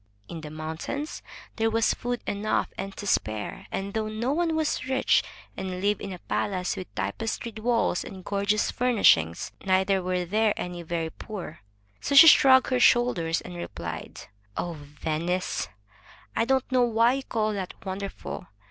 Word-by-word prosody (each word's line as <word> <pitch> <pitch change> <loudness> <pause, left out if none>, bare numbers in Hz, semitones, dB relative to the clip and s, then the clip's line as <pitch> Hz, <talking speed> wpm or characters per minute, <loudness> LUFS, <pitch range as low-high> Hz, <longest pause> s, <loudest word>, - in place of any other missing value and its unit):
In 165 - -7
the 155 - -7
moimtains 160 - -5 0.4
there 225 0 +2
was 225 0 +2
food 245 0 -3
enough 205 +1 0
and 195 0 -6
to 205 - -6
spare, 110 - -1
and 195 +1 -3
though 220 -1 -1
no 225 +5 -1
one 330 0 +1
was 310 -4 -1
rich 265 0 +3 0.3
and 185 -1 -4
lived 205 +2 +1
in 200 - -5
a 180 - -6
palace 180 +1 -2
with 95 - -6
tapestried 220 - -3
walls 230 -5 +1
and 190 -2 -10
gorgeous 200 +1 +1
furnishings, 200 - +3
neither 190 0 +2
were 180 0 -1
there 215 +3 +2
any 180 -1 -4
very 165 -1 -3
poor. 185 -6 -8 0.4
So 280 - -1
she 280 - +12
shrugged 260 -4 +7
her 255 - +2
shoulders 240 -10 +3
and 175 - -9
replied: 85 - -6 0.4
"Oh, 175 - -2
Venice! 160 +4 -3 0.7
I - - +2
don't 265 +1 +1
know 255 -1 +4
why 235 0 +4
you 270 0 -3
call 215 -4 -1
that 190 -3 -4
wonderful. 190 -2 -5
200 Hz, 160 wpm, -27 LUFS, 175-235 Hz, 0.7 s, she